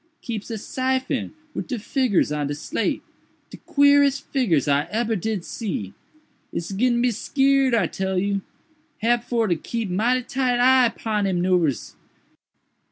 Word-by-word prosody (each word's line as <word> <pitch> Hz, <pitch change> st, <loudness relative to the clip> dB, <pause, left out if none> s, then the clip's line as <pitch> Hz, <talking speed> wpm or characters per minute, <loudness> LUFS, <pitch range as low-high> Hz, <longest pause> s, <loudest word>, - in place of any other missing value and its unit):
"Keeps 225 Hz, -3 st, -5 dB
a 225 Hz, -, -3 dB
syphon 260 Hz, +3 st, -2 dB, 0.2 s
wid -, -, -4 dB
de 255 Hz, -, -3 dB
figgurs 225 Hz, -, +1 dB
on 150 Hz, -1 st, -1 dB
de 145 Hz, -, -3 dB
slate—de 150 Hz, -, -5 dB
queerest 285 Hz, -1 st, +4 dB
figgurs 185 Hz, -, +2 dB
I 145 Hz, +1 st, +2 dB
ebber 225 Hz, +1 st, 0 dB
did 205 Hz, -1 st, -3 dB
see. 175 Hz, -, -4 dB, 0.6 s
Ise 170 Hz, -, -4 dB
gittin' 240 Hz, +5 st, +1 dB
to 240 Hz, -, +1 dB
be 250 Hz, -, +3 dB
skeered, 270 Hz, +2 st, +2 dB
I 230 Hz, -, +2 dB
tell 190 Hz, -1 st, -2 dB
you. 200 Hz, +1 st, 0 dB, 0.6 s
Hab 240 Hz, +1 st, +2 dB
for 235 Hz, -2 st, 0 dB
to 175 Hz, -, +2 dB
keep 225 Hz, +4 st, -4 dB
mighty 240 Hz, +7 st, +1 dB
tight 255 Hz, -1 st, 0 dB
eye 255 Hz, -1 st, +5 dB
'pon 215 Hz, -3 st, -2 dB
him 185 Hz, -2 st, 0 dB
'noovers. 175 Hz, -7 st, +1 dB
225 Hz, 155 wpm, -23 LUFS, 190-255 Hz, 0.6 s, eye